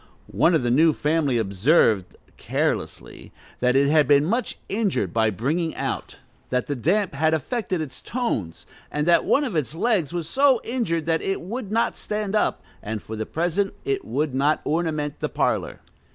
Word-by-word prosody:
One 170 - +3
of 155 - +1
the 120 - +1
new 155 +5 +5
family 150 -4 +1
observed, 105 - +2 0.2
carelessly, - - -3 0.3
"that 125 +1 +2
it 140 +1 +4
had 150 0 +4
been 145 0 +5
much 230 +7 -1
injured 195 - -1
by 110 -1 +3
bringing 150 - -1
out, - - -4 0.3
that 125 0 0
the 145 - -3
damp 180 - +1
had 160 +3 +2
affected 185 - -2
its 135 -5 -6
tones, 195 - -3 0.3
and 150 0 -1
that 170 - +4
one 290 - +3
of 245 -10 -3
its 155 0 -1
legs 185 - +1
was 170 -2 -3
so 270 +4 +4
injured 220 - -1
that 165 0 +1
it 195 - -1
would 210 +3 -6
not 230 +2 +1
stand 210 -1 -3
up, 210 - +1 0.2
and 110 0 -5
for 110 - -6
the 110 0 -4
present 175 +4 -1
it 405 -1 -1
would 150 - -2
not 140 +4 +2
ornament 155 -2 -1
the - - -2
parlor." - - -1
160 Hz, 180 wpm, -24 LUFS, 135-200 Hz, 0.3 s, new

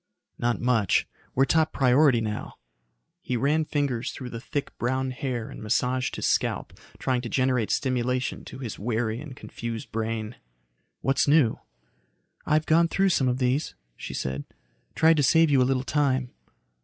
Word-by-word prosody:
"Not 120 0 0
much. 115 -7 +2 0.3
We're 135 - +4
top 160 +1 +2
priority 130 -1 +4
now." 105 -1 -4 0.7
He 125 - -2
ran 150 +5 +2
fingers 140 -6 -1
through 125 -2 -8
the 115 - -6
thick, 145 +2 -4
brown 130 +2 0
hair 125 -3 -4
and - - -9
massaged 125 +4 0
his - - -3
scalp, - - 0 0.2
trying 130 -2 0
to 120 - -6
generate 130 -4 +1
stimulation 125 -1 -1
to - - -9
his 125 -5 -6
wary 110 +2 -1
and 150 -4 -9
confused 115 -2 -6
brain. 110 0 -3 0.6
"What's 135 +1 +2
new?" 145 -6 +4 0.9
"I've 155 +1 +2
gone 165 +1 +4
though 195 0 +4
some 135 -7 +2
of 125 0 +1
these," 130 +3 0 0.2
she - - -7
said. 65 +2 -3 0.5
"Tried 160 0 +5
to 145 - +3
save 160 +2 +4
you 135 -2 +5
a 125 - +3
little 130 -1 +1
time." 135 -3 0
130 Hz, 160 wpm, -26 LUFS, 120-140 Hz, 0.9 s, Tried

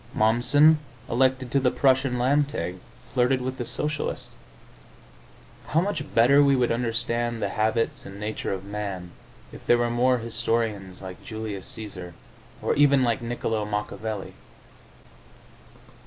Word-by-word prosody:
Momssen, 125 +8 +5 0.3
elected 130 0 +1
to 140 - +3
the 130 -1 +3
Prussian 130 -1 +2
Landtag, 140 -7 0 0.4
flirted 125 +1 +3
with 130 +1 -4
the 120 - -3
Socialists. 150 0 -2 1.4
How 160 - +2
much 165 -5 -3
better 130 +5 +6
we 140 -1 +5
would 125 -2 +2
understand 115 0 -1
the 100 - -1
habits 110 +3 0
and 100 0 -10
nature 105 +1 -3
of 95 0 -4
man 100 -4 -5 0.4
if - - -11
there 120 - +6
were 120 0 0
more 125 +2 +3
historians 115 -5 -2
like 95 -1 -9
Julius 110 -4 -6
Caesar, 105 -8 -7 0.5
or - - +2
even 140 -2 +4
like 120 -2 +1
Niccolo 115 -2 -2
Machiavelli! 105 0 -4
120 Hz, 130 wpm, -25 LUFS, 105-130 Hz, 1.4 s, better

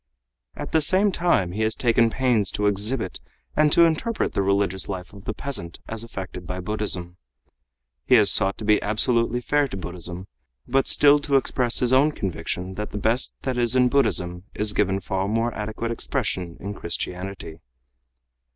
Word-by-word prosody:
At - - -7
the 160 - +3
same 190 +6 +4
time 170 - +1
he 105 +4 -4
has 110 0 +1
taken 115 -1 +2
pains 120 -5 +1
to 105 - -1
exhibit 105 +5 -1 0.4
and 150 0 +3
to 170 - +6
interpret 215 +8 -1
the - - 0
religious 100 -1 0
life 95 -1 -6
of 100 -1 -13
the - - -3
peasant 120 -12 -4
as 115 0 -5
affected 95 -5 -8
by 90 0 -4
Buddhism. 90 -3 -1 0.9
He 125 - +6
has 105 -4 +6
sought 95 +1 +4
to 110 - -7
be 105 0 +3
absolutely 115 +3 0
fair 145 +3 +1
to 95 - -7
Buddhism, 90 0 -3 0.4
but 135 +2 +1
still 145 0 +6
to 145 -1 0
express 125 -2 +2
his 125 0 +3
own 145 +4 +4
conviction 90 - -4
that 105 +2 -5
the - - -6
best 110 +5 0
that 130 -2 -2
is 120 +1 +3
in 125 -1 +4
Buddhism 90 -10 0
is 105 0 0
given 95 -1 0
far 95 +1 -2
more 115 +2 -1
adequate 110 +2 -4
expression 90 -6 -3
in 100 +2 -6
Christianity. 90 -2 -5
105 Hz, 175 wpm, -23 LUFS, 95-125 Hz, 0.9 s, to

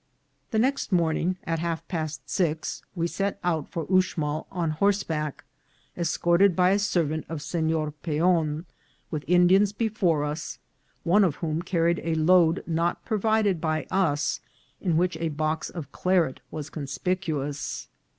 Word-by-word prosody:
The - - -1
next 260 +1 +1
morning 175 +1 +1
at 165 0 -1
half 165 0 -3
past 155 -3 -4
six 160 -3 -1
we 170 -1 0
set 195 +4 -1
out 165 -4 0
for 165 -2 -4
Ux 185 -1 +2
mal 150 0 -2
on 170 -4 -1
horseback, 160 -4 0 0.5
escorted 175 +2 +3
by 180 +1 +4
a 200 - +3
servant 165 -6 0
of 165 -2 -4
Senor 160 0 0
Peon, 160 +1 0 0.5
with 150 -3 -3
Indians 180 +3 +5
before 200 -9 +1
us, 150 +2 -4 0.5
one 200 +5 +5
of 170 -7 +2
whom 160 -1 -2
carried 170 -1 +1
a 165 -1 0
load 165 +1 +4
not 170 +1 -1
provided 215 -5 +1
by 155 -1 0
us, 155 -6 +1 0.4
in 170 -4 +1
which 175 -1 +1
a 165 0 -1
box 155 +1 -1
of 165 -5 -7
claret 180 -7 +1
was 155 0 -6
conspicu 155 +1 -2
ous. 145 0 -5
165 Hz, 150 wpm, -26 LUFS, 155-185 Hz, 0.5 s, Indians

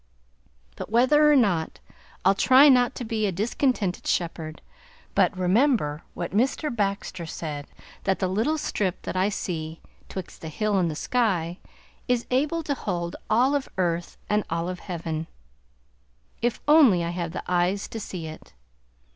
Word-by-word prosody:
But - - -6
whether 295 +7 +5
or - - +6
not, 190 - +1 0.5
I'll 195 - +6
try 260 +8 +6
not 250 -2 +4
to 245 - -5
be 220 -1 0
a - - 0
discontented 210 0 -1
shepherd, 160 -2 -2 0.5
but 190 - +2
remember 185 - +2
what 175 - -4
Mr. 250 - 0
Baxter 195 -4 -2
said, 150 -3 -5 0.4
that 190 0 +2
the 185 - 0
little 225 +12 0
strip 195 - -2
that - - -4
I 185 +2 +2
see 160 -5 -4 0.3
"twixt 190 -2 -7
the 160 - -6
hill 210 +4 0
and 175 -2 +1
the 155 - -4
sky" 180 -5 0 0.5
is 245 -2 +1
able 300 +6 +1
to 295 - -1
hold 175 -9 -3
all 245 +6 +4
of 285 -2 -1
earth 175 -2 -1
and 210 0 +1
all 165 +1 -1
of 180 -1 -5
heaven, 165 -3 -4 1.1
if 240 0 0
only 275 - +6
I 170 - -2
have 175 -1 -3
the 180 - -5
eyes 180 +2 +1
to 225 - -5
see 180 -5 -6
it. 155 0 -10
195 Hz, 160 wpm, -25 LUFS, 170-245 Hz, 1.1 s, or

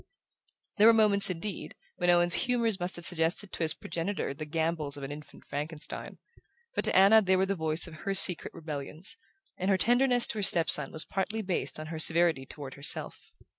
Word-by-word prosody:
There 215 - +6
were 230 - +7
moments, 205 -3 +4
indeed, 185 +3 -6 0.2
when 175 -1 0
Owen's 175 0 +4 0.2
humours 230 -5 0
must 180 +1 -5
have 175 - -5
suggested 175 +3 -1
to - - -7
his 160 -1 +3
progenitor 175 -2 -4
the 155 +2 -8
gambols 160 -2 -3
of 140 - -9
an 135 - -6
infant 150 +1 -12
Frankenstein; 150 +2 -6 0.6
but - - -2
to - - +3
Anna 200 +4 +6
they 190 -2 +1
were 190 +1 +1
the 195 - -2
voice 160 -2 -1
of 165 -3 -11
her 195 +5 -4
secret 185 -3 +6
rebellions, 155 +2 -2 0.4
and 185 +2 -2
her 195 - +3
tenderness 245 +5 +3
to 220 - -5
her - - -2
step 170 -3 +2
son 150 -2 -1
was 155 - -2
partly 210 +3 -3
based 185 -4 -4
on 155 - -7
her 160 - -6
severity 160 -4 +2
toward 140 -2 -9
herself. 140 +1 -1
175 Hz, 200 wpm, -28 LUFS, 155-195 Hz, 0.6 s, were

